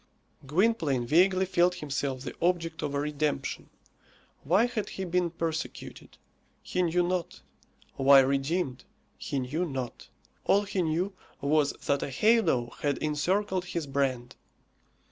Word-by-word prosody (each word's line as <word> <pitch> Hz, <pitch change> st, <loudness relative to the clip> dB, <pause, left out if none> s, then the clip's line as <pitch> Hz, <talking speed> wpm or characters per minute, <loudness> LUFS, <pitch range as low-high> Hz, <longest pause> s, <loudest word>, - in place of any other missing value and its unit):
Gwynplaine 160 Hz, -, +1 dB
vaguely 185 Hz, +7 st, +4 dB
felt 180 Hz, -1 st, +2 dB
himself 140 Hz, -5 st, -3 dB
the 140 Hz, -, -6 dB
object 170 Hz, -1 st, 0 dB
of 145 Hz, -1 st, -2 dB
a -, -, +1 dB
redemption. 150 Hz, 0 st, -2 dB, 0.7 s
Why 185 Hz, +10 st, +4 dB
had 235 Hz, -4 st, -3 dB
he 190 Hz, -, -5 dB
been 180 Hz, 0 st, +1 dB
persecuted? 165 Hz, -1 st, -5 dB, 0.5 s
He 180 Hz, -, -1 dB
knew 175 Hz, 0 st, +2 dB
not. 175 Hz, -, -2 dB, 0.6 s
Why 135 Hz, 0 st, +7 dB
redeemed? 135 Hz, 0 st, -1 dB, 0.4 s
He 145 Hz, -, -3 dB
knew 135 Hz, +7 st, -1 dB
not. 135 Hz, -7 st, -5 dB, 0.3 s
All 200 Hz, +1 st, +3 dB
he 200 Hz, -2 st, -2 dB
knew 175 Hz, +4 st, -1 dB, 0.3 s
was 145 Hz, 0 st, +2 dB
that 140 Hz, 0 st, +1 dB
a -, -, -3 dB
halo 135 Hz, -, +2 dB
had 145 Hz, -2 st, 0 dB
encircled 185 Hz, +5 st, 0 dB
his 170 Hz, -3 st, -3 dB
brand. 130 Hz, -3 st, -1 dB
160 Hz, 130 wpm, -28 LUFS, 140-180 Hz, 0.7 s, Why